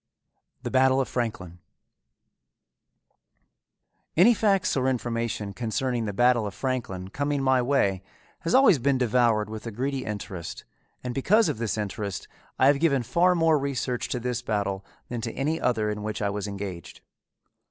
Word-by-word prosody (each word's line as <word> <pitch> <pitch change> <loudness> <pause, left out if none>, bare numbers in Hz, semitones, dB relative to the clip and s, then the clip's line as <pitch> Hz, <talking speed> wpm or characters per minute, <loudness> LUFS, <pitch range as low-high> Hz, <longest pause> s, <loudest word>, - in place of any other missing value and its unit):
THE - - -4
BATTLE 130 0 +4
OF 135 - 0
FRANKLIN 95 -8 -4 2.6
Any 205 +8 +7
facts 200 -4 +1
or 130 -1 +1
information 115 -4 -2
concerning 120 +1 -2
the 105 - -2
Battle 120 +1 +3
of 100 - -8
Franklin 105 -8 -3
coming 145 +3 -1
my 130 -1 +3
way 120 -8 +1 0.4
has 165 - 0
always 260 - +6
been 135 +2 +2
devoured 120 -3 +2
with 110 +1 -7
a - - -4
greedy 130 +4 -2
interest, 95 -5 -6 0.4
and 125 -1 -3
because 205 - +3
of - - -3
this 115 -2 -2
interest, 100 -2 -4 0.3
I - - +4
have 140 +1 +5
given 140 -6 +2
far 180 +9 +3
more 165 -3 +3
research 130 -3 -2
to 125 - -2
this 125 0 -2
battle 100 -4 -2 0.3
than 120 -1 -4
to 115 -1 -4
any 155 +4 -1
other 110 -4 +1
in 105 0 -5
which 105 0 -4
I 100 -1 0
was 105 0 -4
engaged. 100 -4 -7
120 Hz, 160 wpm, -26 LUFS, 105-135 Hz, 2.6 s, Any